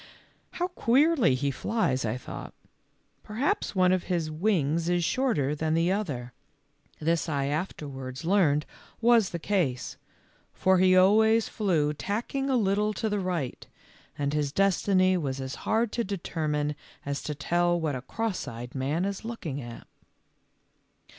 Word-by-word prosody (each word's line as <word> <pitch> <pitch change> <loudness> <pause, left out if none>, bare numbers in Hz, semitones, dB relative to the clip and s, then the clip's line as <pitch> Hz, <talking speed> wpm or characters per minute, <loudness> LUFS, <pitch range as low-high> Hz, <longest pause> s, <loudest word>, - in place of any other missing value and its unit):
"How 355 +1 -1
queerly 275 - +3
he 140 +2 0
flies," 135 - 0
I 110 +3 -1
thought; 125 - -8 0.4
" - - -44 0.3
perhaps 255 - -1
one 185 -1 +4
of 185 -1 +1
his 170 -4 -1
wings 165 -2 +1
is 175 -1 +2
shorter 165 - +1
than 155 +1 0
the 165 +2 +2
other." 140 - -3 0.7
This 165 +2 0
I 140 -2 0
afterwards 140 -3 -4
learned 165 -6 +3 0.3
was 230 -3 +4
the 170 - -4
case, 165 -9 -1 0.6
for 190 -1 +3
he 185 0 +5
always 220 +4 +5
flew 165 -8 +1
tacking 240 - -2
a 260 - +3
little 210 0 +1
to 220 +2 -2
the 205 -1 0
right, 175 -9 -3 0.5
and 145 0 -1
his 150 -2 0
destiny 185 0 +3
was 135 -5 -3
as 130 0 -4 0.2
hard 225 0 +2
to 235 - -1
determine 155 -6 -2 0.3
as 140 0 -3
to 150 - -4
tell 175 +4 +1
what 155 -3 -1
a 130 - -4
cross 225 - -3
eyed 120 +2 -7
man 145 +7 -1
is 200 +1 -4
looking 175 - -5
at. 120 -1 -9
175 Hz, 150 wpm, -27 LUFS, 145-205 Hz, 0.7 s, he